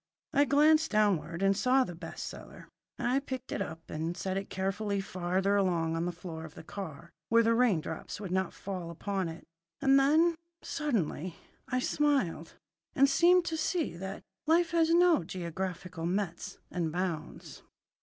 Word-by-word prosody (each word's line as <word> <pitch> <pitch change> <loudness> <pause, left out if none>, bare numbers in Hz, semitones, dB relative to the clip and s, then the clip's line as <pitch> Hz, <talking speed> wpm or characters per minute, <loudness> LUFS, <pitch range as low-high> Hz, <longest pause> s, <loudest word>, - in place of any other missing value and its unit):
I 285 - +5
glanced 305 +3 +4
downward 190 -5 +1
and 195 0 +4
saw 255 +5 +3
the 175 - -6
best 165 -1 -7
seller. - - -10 0.3
I 250 +3 +1
picked 260 -2 -6
it - - -2
up 165 -3 -6
and 165 +3 -3
set 190 +1 -2
it 195 +1 -3
carefully 200 +2 -1
farther 190 +1 0
along 170 -5 +1
on 165 +1 -1
the 175 - -1
floor 170 -2 -8
of 160 - -10
the - - -10
car, 170 -3 -8 0.2
where 230 0 +5
the 230 +1 +3
rain 230 -8 +3
drops 160 +4 -6
would 195 -4 -6
not 190 -1 0
fall 185 -4 -6
upon 190 +1 -2
it. 165 +1 -9 0.4
And 270 0 +5
then, 315 +5 +4 0.3
suddenly, 185 - -2 0.3
I 250 - -1
smiled, 255 - 0 0.4
and 275 +1 +6
seemed 345 +6 +5
to 320 - -2
see 320 +1 0
that 190 +3 -6 0.2
life 335 +1 +4
has 330 -1 +3
no 345 - +5
geographical 180 0 -4
metes 185 -2 -2
and 170 -3 -1
bounds. 175 -1 -4
195 Hz, 165 wpm, -31 LUFS, 170-270 Hz, 0.4 s, and